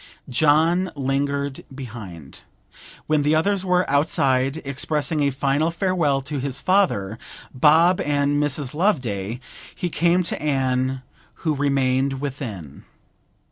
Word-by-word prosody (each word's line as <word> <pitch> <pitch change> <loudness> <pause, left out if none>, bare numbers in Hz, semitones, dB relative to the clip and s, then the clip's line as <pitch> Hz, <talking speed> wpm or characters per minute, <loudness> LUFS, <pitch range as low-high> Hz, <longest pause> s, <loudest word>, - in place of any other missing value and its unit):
John 160 +7 +3
lingered 140 0 -2
behind. 105 - -9 0.6
When 155 -1 +2
the 150 +2 +2
others 190 +4 +1
were 180 -1 +2
outside, 135 -1 +1
expressing 150 +3 -1
a 140 - +3
final 140 +3 0
farewell 170 -6 0
to 140 +1 -4
his 135 0 -3
father, 120 - +1 0.3
Bob, 160 +7 +4
and 145 0 +1
Mrs. 145 -2 -2
Loveday, 125 - -1 0.4
he 175 -3 -3
came 175 +4 +2
to 165 - -4
Anne, 130 -2 0 0.4
who 155 - +2
remained 135 -1 +1
within. 115 - -6
140 Hz, 115 wpm, -22 LUFS, 130-155 Hz, 0.6 s, Bob